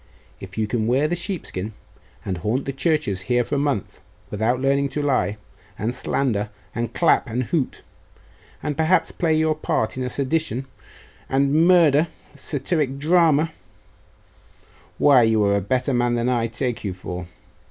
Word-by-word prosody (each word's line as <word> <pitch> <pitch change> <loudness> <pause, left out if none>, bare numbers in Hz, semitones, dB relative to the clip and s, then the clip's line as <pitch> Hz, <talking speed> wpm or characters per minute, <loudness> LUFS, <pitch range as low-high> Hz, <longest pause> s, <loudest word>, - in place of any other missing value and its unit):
If 95 +1 -10
you 110 - +1
can 110 0 -1
wear 135 +5 +2
the 175 - -1
sheepskin, 170 - -4 0.5
and 95 -3 -3
haunt 110 +9 -1
the 135 - -3
churches 140 - 0
here 120 0 +3
for 130 - -7
a - - +2
month, 140 -8 -2 0.3
without 110 +4 0
learning 140 +1 +1
to 150 - -1
lie, 130 -7 +1 0.4
and 110 +4 -2
slander, 120 -5 -1 0.2
and 115 0 -3
clap, - - +2
and 125 +3 -1
hoot, 140 +2 -2 0.8
and 150 - -2
perhaps 160 +4 +2
play 165 -3 +1
your 155 0 +2
part 130 -6 -1
in 130 - -2
a 125 - -2
sedition 135 -2 -1 0.6
and 140 +5 +3
murder 165 -4 +5 0.3
satyric 145 -1 -1
drama 160 0 +3 1.5
why, 140 -4 +6
you 110 -2 +3
are 100 0 +3
a 100 - +1
better 130 +7 0
man 120 0 +2
than 120 +1 0
I 120 -2 +1
take 120 +1 -3
you 95 -4 -3
for. 90 -1 -6
130 Hz, 160 wpm, -22 LUFS, 110-150 Hz, 1.5 s, why